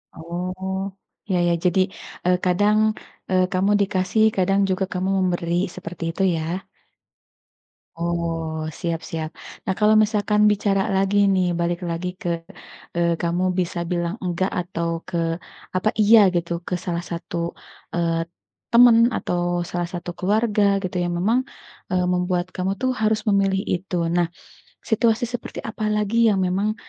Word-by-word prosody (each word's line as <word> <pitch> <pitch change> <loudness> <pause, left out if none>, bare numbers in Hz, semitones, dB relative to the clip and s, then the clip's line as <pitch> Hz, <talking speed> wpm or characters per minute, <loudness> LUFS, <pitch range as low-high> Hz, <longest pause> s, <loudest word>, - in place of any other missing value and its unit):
Oh, 185 +3 -4 0.4
ya 185 - +2
ya, 170 - +3
jadi, 180 +1 +3 0.5
eee, 180 0 +4
kadang, 205 +4 +3 0.5
eee, 185 -1 +3
kamu 190 +2 +2
dikasih 190 +2 +1
kadang 195 +1 +2
juga 190 +1 +1
kamu 185 +1 -1
memberi, 175 -2 0 0.2
seperti 175 -1 -7
itu 195 - -2
ya? 165 +4 -3 1.3
Oh, 165 -2 -2
siap 170 -1 -1
siap. 160 -1 -3 0.4
Nah, - - +1
kalau 215 0 +5
misalkan 210 -1 +1
bicara 200 -1 +1
lagi 195 +1 +2 0.2
nih, 185 -1 +2
balik 170 0 0
lagi 170 +2 -3
ke, 175 - -2 0.7
eee, 170 0 +2
kamu 175 +1 0 0.2
bisa 175 -1 -1
bilang 175 +1 -1
enggak, 180 +1 0
atau 170 -1 -3 0.2
ke, 175 - -3 0.6
apa 185 +4 +2
iya 220 +2 +7 0.2
gitu 170 0 -1 0.2
ke - - -3
salah 175 -1 -2
satu, 170 0 -5 0.6
eee, 165 -1 0 0.5
temen 235 -1 +7
atau 175 0 -1
salah 175 -1 -2
satu 175 0 -5
keluarga 210 +4 +1 0.2
gitu 185 0 -4
yang 175 0 -1
memang, 220 +8 +2 0.5
eee, 180 -1 +2
membuat 180 0 0
kamu 185 +1 -1
tuh 260 0 +2
harus 215 0 +2
memilih 195 -1 +2
itu. 180 +1 -3 0.2
Nah, 175 -1 +3 0.6
situasi 225 +2 +2
seperti 245 0 -4
apa 215 0 -6
lagi 220 +2 +2
yang 205 -3 +3
memang, 195 +4 0
185 Hz, 145 wpm, -23 LUFS, 175-200 Hz, 1.3 s, iya